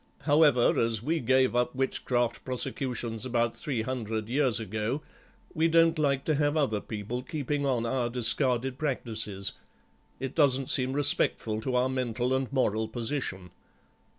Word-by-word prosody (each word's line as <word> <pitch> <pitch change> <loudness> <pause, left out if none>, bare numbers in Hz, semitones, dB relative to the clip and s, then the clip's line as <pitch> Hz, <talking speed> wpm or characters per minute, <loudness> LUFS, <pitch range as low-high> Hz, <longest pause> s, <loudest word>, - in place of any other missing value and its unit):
However, 145 -4 +4
as 115 -2 0
we 160 +5 0
gave 130 0 +2
up 125 +2 0
witchcraft 120 -2 -1
prosecutions 125 -3 -2
about 120 -2 0
three 125 -7 -3
hundred 110 -3 -3
years 130 -3 +2
ago, 110 +7 -3 0.5
we 160 +1 +2
don't 165 -1 +4
like 140 -2 +1
to 155 - +1
have 145 +1 +1
other 110 -9 +1
people 110 +3 -5
keeping 145 +1 -2
on 120 -3 0
our 120 0 -1
discarded 125 +1 0
practices; 110 -9 -2 0.7
it 135 +1 -4
doesn't 135 -4 +3
seem 130 0 +1
respectful 115 -6 +2
to 125 +2 -2
our 125 +1 +3
mental 125 -1 -1
and 130 -1 -2
moral 110 -5 0
position." 110 -6 -3
125 Hz, 145 wpm, -28 LUFS, 115-140 Hz, 0.7 s, However